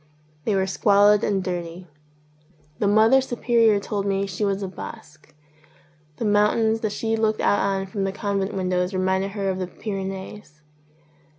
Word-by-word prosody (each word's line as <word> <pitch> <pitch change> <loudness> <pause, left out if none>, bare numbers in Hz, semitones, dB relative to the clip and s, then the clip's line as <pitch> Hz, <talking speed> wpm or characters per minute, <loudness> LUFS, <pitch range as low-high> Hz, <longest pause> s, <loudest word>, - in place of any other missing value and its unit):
They 210 - +1
were 190 -1 +1
squalid 205 +2 +4
and 195 -2 0
dirty. 175 -1 -5 0.9
The 205 - +1
Mother 220 +6 +5
Su 255 -2 -5
perior 230 -3 +3
told 200 0 -3
me 195 0 0
she 195 +1 -4
was 200 0 0
a - - -2
Basque. 155 -4 -11 0.8
The 230 - -3
mountains 215 +2 +2
that 215 -2 -2
she 225 +2 -1
looked 220 -1 0
out 205 - +2
on 195 -1 0
from 195 +1 -4
the 195 - -1
convent 200 -1 -2
windows 185 0 -1
reminded 190 +1 0
her 200 -2 -3
of 190 -1 -1
the 185 - -3
Pyrenees. 190 -4 -7
200 Hz, 165 wpm, -23 LUFS, 190-210 Hz, 0.9 s, Mother